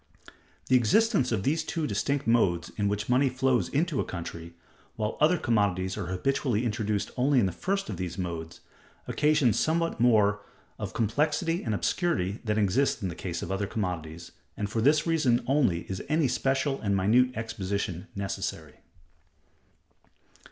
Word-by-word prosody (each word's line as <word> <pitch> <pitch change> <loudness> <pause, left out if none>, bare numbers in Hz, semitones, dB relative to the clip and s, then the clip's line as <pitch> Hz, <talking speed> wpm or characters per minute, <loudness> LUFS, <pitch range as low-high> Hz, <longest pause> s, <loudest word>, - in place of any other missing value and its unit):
The 130 - +3
existence 130 - +3
of 105 -4 0
these 155 +6 +1
two 160 -1 -2
distinct 140 +5 -1
modes 95 -8 +2
in 100 -1 0
which 105 0 -2
money 130 +2 +3
flows 130 -7 +1
into 155 0 0
a - - +2
country, 85 -1 -7 0.4
while 110 -1 -2
other 160 +4 +5
commodities 95 - 0
are 100 -5 -4
habitually 120 - 0
introduced 105 -2 -1
only 135 +1 +3
in 110 - +3
the 95 - 0
first 195 - -2
of - - -5
these 90 -1 -4
modes, 85 -3 -5 0.5
occasions 150 -7 +2
somewhat 165 -2 0
more 105 -4 +4 0.4
of - - -5
complexity 155 - 0
and 110 -4 -2
obscurity 110 - -1
than 105 -2 -1
exists 110 +5 +1
in 95 - -1
the - - -5
case 85 0 -5
of - - -5
other 100 +1 -1
commodities, 85 -6 -4 0.3
and 105 -1 -3
for 115 - 0
this 150 +5 +4
reason 150 -9 +2
only 125 - +2
is 95 -1 -6
any 155 -2 +2
special 135 +2 0
and 100 -2 +1
minute 120 +7 +3
exposition 100 -5 -3
necessary. 95 -6 -4
110 Hz, 160 wpm, -28 LUFS, 95-140 Hz, 0.5 s, other